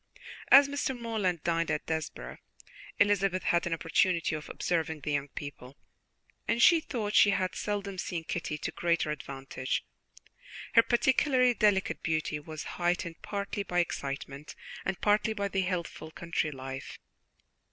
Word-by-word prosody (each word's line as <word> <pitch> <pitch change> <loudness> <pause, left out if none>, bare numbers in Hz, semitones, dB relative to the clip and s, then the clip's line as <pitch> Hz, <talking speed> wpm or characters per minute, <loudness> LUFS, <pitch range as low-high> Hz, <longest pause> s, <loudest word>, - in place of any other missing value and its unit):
As 280 +1 +8
Mr. 280 -3 -2
Morland 205 -8 -1
dined 165 -1 0
at 150 - -1
Desborough, 150 - -4 0.6
Elizabeth 195 -2 +2
had 170 0 +2
an 170 - -1
opportunity 165 +1 +1
of 155 -1 -5
observing 160 -3 -1
the 150 - -3
young 145 -1 0
people, 140 -1 -9 0.7
and 230 - +1
she 330 +7 +7
thought 225 -9 -3
she 205 - +7
had 190 -2 0
seldom 200 -2 -3
seen 170 -2 -3
Kitty 160 -2 -3
to - - -4
greater 170 -3 0
advantage; 135 -2 -4 0.9
her 230 - +9
particularly 255 +1 +3
delicate 205 -4 +2
beauty 155 -2 -1
was 155 0 -7 0.2
heightened 175 -1 -1
partly 200 0 -3
by 180 -3 -3
excitement 140 -3 -3 0.3
and 190 -1 -2
partly 215 +1 +3
by 200 -2 -1
the 195 -1 0
healthful 180 -3 -3
country 170 -1 -2
life. 135 -1 -7
175 Hz, 140 wpm, -30 LUFS, 150-205 Hz, 0.9 s, her